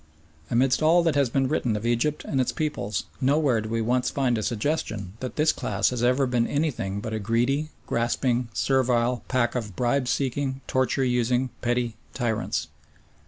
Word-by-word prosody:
Amidst 125 +4 +2
all 165 +3 +5
that 165 -2 +2
has 140 -3 +2
been 135 +2 +1
written 125 -6 0
of 105 +2 -4
Egypt 120 +6 0
and 135 - +1
its 125 - 0
peoples 105 - -2 0.2
nowhere 135 -3 +3
do 110 - -6
we 115 0 0
once 125 +3 +1
find 130 -3 +1
a 110 - -1
suggestion 110 - -2
that 130 - -5
this 155 +1 +3
class - - 0
has 125 -2 -3
ever 125 +3 +3
been 125 -2 +1
anything 125 -10 -1
but 110 - -5
a 110 - -1
greedy, 120 +8 0 0.2
grasping, 120 +1 0
servile 125 -2 +1
pack 120 -2 +1
of 110 -7 -4
bribe 125 +4 +1
seeking, 135 +1 -1
torture 130 +1 +1
using, 125 +1 +1
petty 120 -2 -1 0.2
tyrants. 120 -4 -1
125 Hz, 170 wpm, -25 LUFS, 115-135 Hz, 0.2 s, all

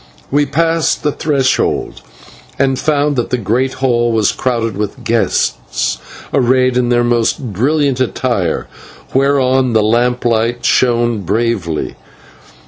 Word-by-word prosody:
We 145 +1 +2
passed 165 +3 0
the 150 - +1
threshold 135 - -1 0.6
and 135 -2 +1
found 145 -1 +1
that 120 - -1
the 125 - 0
great 120 +4 0
hall 120 -3 +1
was 110 -3 +2
crowded 115 -4 -2
with 105 +5 -4
guests 115 - -1 0.3
arrayed 130 -1 +2
in 125 -1 +1
their 120 0 +2
most 120 0 0
brilliant 140 +4 +1
attire, 120 -8 -1 0.5
whereon 130 -2 +2
the 110 -1 +3
lamplight 120 +1 +1
shone 120 -3 +2
bravely. 100 -4 -2
120 Hz, 120 wpm, -15 LUFS, 115-135 Hz, 0.6 s, the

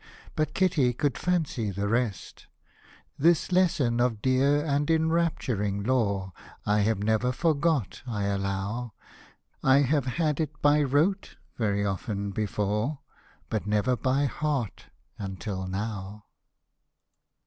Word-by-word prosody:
But 155 0 -1
Kitty 165 -10 +2
could 140 +1 0
fancy 160 - -1
the 100 +1 -2
rest. 115 -3 -2 0.7
This 170 +3 +3
lesson 160 -10 +2
of 120 -3 +1
dear 140 +5 +2
and 145 0 0
enrapturing 160 - +1
lore 100 -6 0 0.3
I 105 +1 +2
have 105 -1 +1
never 110 +3 +2
forgot, 150 - 0
I 105 -4 -2
allow: 100 +4 -2 0.7
1 135 +2 +4
have 140 -1 +1
had 150 +2 0
it 150 -2 -3
by 145 +1 +4
rote 150 +8 +1 0.2
very 100 -3 0
often 100 +1 -3
before, 105 +6 -1 0.5
But 110 -2 -3
never 105 +4 +2
by 135 +3 +1
heart 140 -5 -2 0.3
until 95 -1 -4
now. 105 +1 -5
120 Hz, 115 wpm, -27 LUFS, 105-145 Hz, 0.7 s, 1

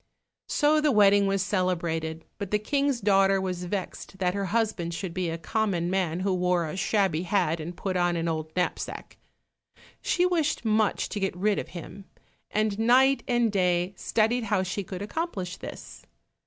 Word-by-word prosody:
So 305 +1 +3
the 300 -1 +3
wedding 205 -2 +5
was 195 -1 +1
celebrated, 170 -5 -1
but 200 -2 -4
the 210 - +2
King's 275 +3 0
daughter 195 -1 +4
was 180 -1 -3
vexed 190 +1 -5
that 180 -2 0
her 200 0 -2
husband 195 -5 -1
should 180 -1 -5
be 185 -2 -1
a 165 - -3
common 180 -1 -1
man, 180 -2 0
who 190 0 +1
wore 180 -1 +1
a 155 - -5
shabby 190 -4 +1
hat, 175 -3 +1
and 170 +3 -6
put 190 -2 -3
on 175 -1 +2
an 165 0 -1
old 155 -1 -2
knapsack. 180 -1 -3 0.8
She 360 - +2
wished 325 -8 0
much 215 -1 +2
to 205 - -4
get 195 -2 -2
rid 205 +2 +1
of - - -5
him, 195 +3 -9 0.4
and 215 -1 0
night 260 +4 +4
and 240 -2 +2
day 180 -1 +1
studied 225 +4 +1
how 200 -3 +1
she 190 +2 -3
could 185 +1 -6
accomplished 205 - -4
this. - - -9
195 Hz, 175 wpm, -27 LUFS, 180-215 Hz, 0.8 s, wedding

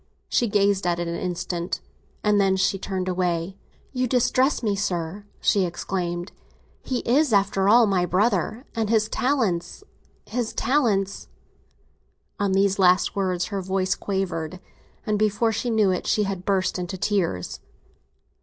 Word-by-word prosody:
She 240 - +1
gazed 200 -2 +2
at 175 -1 +1
it 175 0 -3
an 170 - -3
instant, 175 0 -3 0.4
and 210 -1 +3
then 190 -1 +3
she 190 +1 +1
turned 185 -1 -3
away. 180 0 -1 0.4
"You 255 -1 0
distress 255 +2 +2
me, 210 -3 +1
sir!" 190 0 -3
she 200 - +3
exclaimed. 175 0 -3 0.5
"He 255 -2 -2
is, 280 +3 +2
after 195 -1 +2
all, 235 +2 +7
my 185 -4 +1
brother, 210 - 0
and 225 -2 -1
his 220 -1 +3
talents, 235 - -1 0.4
his 240 -1 -3
talents—" 210 -9 0 1.1
On 200 -1 +1
these 195 0 +2
last 185 -1 +4
words 185 -3 0
her 195 - -1
voice 190 0 0
quavered, 185 -4 -3 0.5
and 210 -1 0
before 215 +2 +2
he 230 +3 -2
knew 215 -4 +3
it 180 - -2
she 210 - +2
had 195 -2 -4
burst 190 -2 0
into 180 +1 -4
tears. 180 - -1
195 Hz, 145 wpm, -24 LUFS, 180-215 Hz, 1.1 s, all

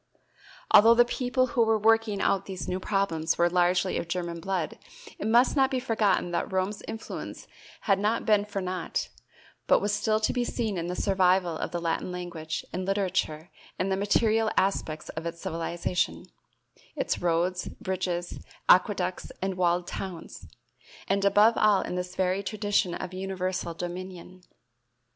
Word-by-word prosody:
Although 225 +3 +8
the 240 +1 +6
people 250 +1 0
who 245 - +3
were 225 0 +3
working 220 -1 +2
out 195 0 +1
these 190 -2 -5
new 185 - -2
problems 185 -5 0
were 175 0 +3
largely 180 +1 +2
of 170 - -5
German 170 -1 -3
blood, 180 -3 -3 0.4
it 210 - -2
must 240 +6 +4
not 270 -2 +4
be 260 - -1
forgotten 220 -7 +1
that 175 - -2
Rome's 190 +2 -1
influence 225 0 -7 0.3
had 195 -3 +2
not 215 +3 0
been 210 -2 +4
for 200 -1 -4
naught, 180 -1 -3 0.6
but - - +5
was 205 0 -1
still 215 +1 +1
to 215 - 0
be 245 - 0
seen 225 -4 -2
in 170 - -3
the 180 - -3
survival 185 -3 +2
of - - -3
the 175 - -3
Latin 170 +1 -2
language 170 -3 -5
and 185 +2 -2
literature 185 -5 -1 0.3
and 190 +1 -1
the - - +2
material 220 +2 +2
aspects 160 -5 0
of 160 +1 -5
its 170 0 -6
civilization 170 +2 -2 0.7
its - - -2
roads, 175 +1 0
bridges, 180 -2 -3 0.3
aqueducts 185 -1 +3
and 190 0 -1
walled 175 -1 +1
towns, 180 -2 -7 0.6
and 195 +1 +1
above 210 +3 +5
all 210 -2 +4
in - - -5
this 180 0 -4
very 185 +1 +1
tradition 200 -3 0
of 185 0 -6
universal 185 -2 -3
dominion. 180 +1 -7
185 Hz, 160 wpm, -27 LUFS, 175-210 Hz, 0.7 s, Although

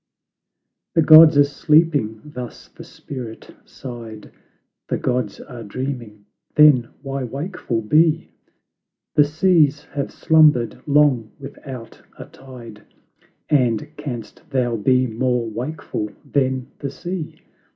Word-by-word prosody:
"The 165 - +4
Gods 155 -1 +8
are 145 - +7
sleeping," 145 -6 +1
thus 125 -5 -9
the - - -13
spirit 120 -5 -9
sighed; 115 -4 -10 0.6
"The - - -1
Gods 125 -5 -2
are 120 -2 -10
dreaming," 115 -2 -6 0.3
then 145 -6 +6
why 135 -1 -4
wakeful 135 - -4
be? 160 +7 +2 0.8
The 150 - +5
seas 155 -2 +2
have 140 -1 -3
slumbered 155 -8 +3
long 140 -6 +3
without 135 -3 -10 0.2
a - - -9
tide, 120 -5 -13 0.7
And 125 0 0
canst 130 -7 -7
thou 125 -3 0
be 125 +4 +2
more 125 0 -1
wakeful 120 -1 -5 0.2
than 130 -2 -1
the 140 - -4
sea? 175 +3 -6
130 Hz, 110 wpm, -20 LUFS, 120-150 Hz, 0.8 s, Gods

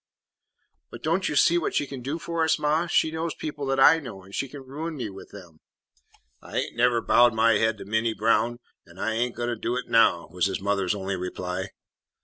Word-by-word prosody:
"But 120 - -11
don't 170 +4 0
you - - -3
see 170 +4 +4
what 165 - -3
she - - +1
can 135 -2 -8
do 140 +6 -3
for 170 0 -2
us, 160 - +2
ma? 155 +3 +1
She 160 -1 +2
knows 160 0 -3
people 145 -2 -5
that 135 0 0
I 165 +4 +7
know, 100 -10 -9
and 95 +1 -16
she 135 - -2
can 140 0 -10
ruin 155 +5 -6
me 115 -6 -4
with 95 - -12
them." 90 -6 -13 0.8
"I - - -7
ain't - - -2
never 120 0 +3
bowed 120 -1 +5
my 110 -1 +4
haid 110 -1 +1
to - - -9
Minty 110 +2 0
Brown 115 +2 +1 0.3
an' 85 +1 -17
I 110 - -1
ain't 120 +2 -1
a - - -21
goin' 120 0 -2
to 120 - -1
do 115 +2 -2
it 125 - -4
now," 85 -7 +4
was 90 +1 +1
his 95 - -3
mother's 100 -1 0
only 95 -1 -3
reply. 90 +1 -4
120 Hz, 230 wpm, -25 LUFS, 100-145 Hz, 0.8 s, I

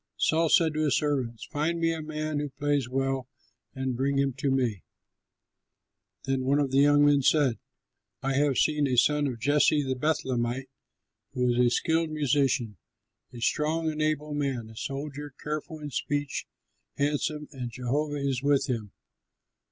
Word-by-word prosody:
Saul 165 0 +2
said 160 -2 +4
to 155 - -2
his 140 - +3
servants, 130 -7 -1
"Find 160 +3 0
me 165 0 +2
a 160 - -4
man 155 -1 -3
who 145 0 -3
plays 145 -2 -1
well, 135 -1 -1 0.5
and 130 -1 -2
bring 135 +2 0
him 140 -1 +1
to 140 - 0
me." 125 -8 0 1.4
Then 135 0 -1
one 135 +2 +2
of 140 -3 +1
the 135 - +3
young 145 +1 +5
men 145 -1 +4
said, 135 -3 +3 0.6
"I 135 0 0
have 140 -1 +2
seen 150 -2 +2
a 125 -2 0
son 150 +3 +3
of 125 -3 -4
Jesse 145 +3 +3
the 130 -1 -1
Bethlehemite 130 -3 -1 0.6
who 125 -1 +1
is 120 - 0
a 125 -1 +5
skilled 160 +6 +1
musician, 135 -7 +1 0.5
a 120 - -10
strong 160 +5 +1
and 155 0 -4
able 150 -1 -1
man, 135 -6 -2
a - - -14
soldier, 145 +3 -5
careful 155 +1 -4
in 150 -1 -7
speech, 145 +1 -2 0.5
handsome, 150 +1 -1
and 125 -4 -5
Jehovah 135 +5 -2
is 130 -2 -1
with 140 -1 +2
him." 110 -6 -3
140 Hz, 165 wpm, -28 LUFS, 130-150 Hz, 1.4 s, young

